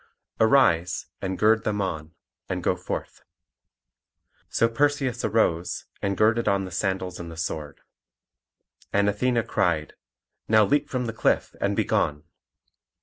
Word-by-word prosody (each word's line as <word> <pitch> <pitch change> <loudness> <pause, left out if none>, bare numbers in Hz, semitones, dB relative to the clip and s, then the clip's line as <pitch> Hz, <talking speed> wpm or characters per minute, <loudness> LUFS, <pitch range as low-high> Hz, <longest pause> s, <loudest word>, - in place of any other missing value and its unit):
Arise, 110 -8 +3 0.2
and 95 -1 -3
gird 110 +1 +3
them 105 -1 -1
on, 80 -4 -4 0.3
and - - -3
go - - +2
forth." - - -6 1.3
So 115 - +3
Perseus 135 0 0
arose, 95 -6 0 0.2
and 100 -1 -1
girded 115 +2 +3
on 100 -1 +2
the 90 - -8
sandals 95 0 -2
and 85 -1 -7
the 80 - -10
sword. 75 -3 -5 1.1
And 100 0 +2
Athene 120 +3 +1
cried, 85 -8 0 0.5
"Now 110 -1 +5
leap 145 +5 +1
from 125 -2 -2
the 115 - -3
cliff 115 - 0
and - - +1
be - - +2
gone." 75 0 0
100 Hz, 140 wpm, -25 LUFS, 85-115 Hz, 1.3 s, Now